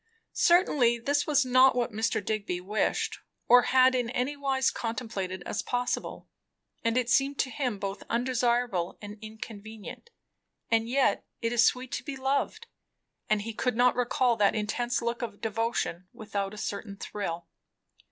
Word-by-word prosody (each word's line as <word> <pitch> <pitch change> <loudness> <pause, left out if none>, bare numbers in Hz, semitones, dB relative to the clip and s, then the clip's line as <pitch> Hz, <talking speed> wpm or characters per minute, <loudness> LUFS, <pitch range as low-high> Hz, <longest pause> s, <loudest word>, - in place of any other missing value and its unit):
Certainly 295 -9 +4
this 285 +5 0
was 290 -3 +3
not 255 +1 +5
what 245 -1 0
Mr. 220 -2 -1
Digby 200 -4 -2
wished, 205 +4 -1 0.3
or 245 +1 +8
had 260 0 +6
in 245 -2 0
any 255 +4 -1
wise 270 -2 +1
contemplated 210 -6 -4
as 205 - -2
possible, 245 0 -3 0.6
and 230 +1 +1
it 250 -2 +1
seemed 275 +3 +2
to 260 - 0
him 245 -3 -2
both 195 0 -4
undesirable 240 -6 0
and 205 0 -9
inconvenient; 220 - -9 0.6
and 225 0 +2
yet, 270 +1 +2 0.2
it 230 +1 0
is 235 -1 +5
sweet 250 +2 +1
to - - -3
be 280 - -5
loved; 275 - -1 0.6
and 215 -1 +2
he 225 +1 -5
could 250 +1 -1
not 245 +1 +4
recall 245 0 +2
that 205 0 +3
intense 240 +3 -1
look 235 +1 -2
of 215 -4 -5
devotion 225 -5 -2
without 205 -2 -4
a - - -11
certain 200 -1 -5
thrill. 170 -5 -5
235 Hz, 155 wpm, -28 LUFS, 210-255 Hz, 0.6 s, or